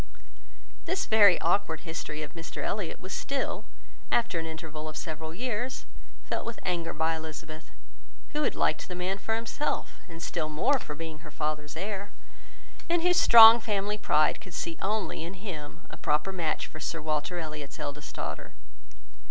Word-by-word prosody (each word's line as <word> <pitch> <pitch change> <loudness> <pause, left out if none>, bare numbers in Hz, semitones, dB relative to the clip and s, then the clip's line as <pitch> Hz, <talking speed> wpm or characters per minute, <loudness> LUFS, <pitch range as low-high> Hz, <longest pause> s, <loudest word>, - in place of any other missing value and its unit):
This 380 - 0
very 205 -5 +7
awkward 165 -3 +1
history 160 -2 -5
of 150 - -8
Mr 165 -1 -6
Elliot 200 -5 -2
was 185 - -7
still, 275 -1 -2 0.5
after 215 -8 +2
an 165 - -4
interval 155 -1 -6
of 155 - -8
several 160 -1 -5
years, 245 +6 -3 0.4
felt - - -2
with 230 - -6
anger 170 -2 -1
by 160 +1 +1
Elizabeth, 160 0 -8 0.6
who 300 - -1
had 295 - +1
liked - - +1
the 180 - -5
man 185 +2 -2
for 220 +3 -1
himself, 230 +6 -2
and 165 -1 -9
still 160 -3 -2
more 245 - +2
for 150 - -7
being 160 0 -6
her 155 0 -11
father's 150 0 -3
heir, 200 +2 -4 0.8
and 340 -1 +2
whose 360 0 +5
strong 230 0 +11
family 210 -1 -1
pride 150 -6 +3
could 180 -3 -10
see 165 - -2
only 210 -3 -1
in 175 +3 -6
him 170 -5 -7
a - - -10
proper 150 +6 +1
match 165 -4 -1
for 155 - -10
Sir 165 +1 -3
Walter 155 +3 -1
Elliot's 155 -4 -6
eldest 150 0 -6
daughter. - - -5
165 Hz, 170 wpm, -29 LUFS, 155-210 Hz, 0.8 s, strong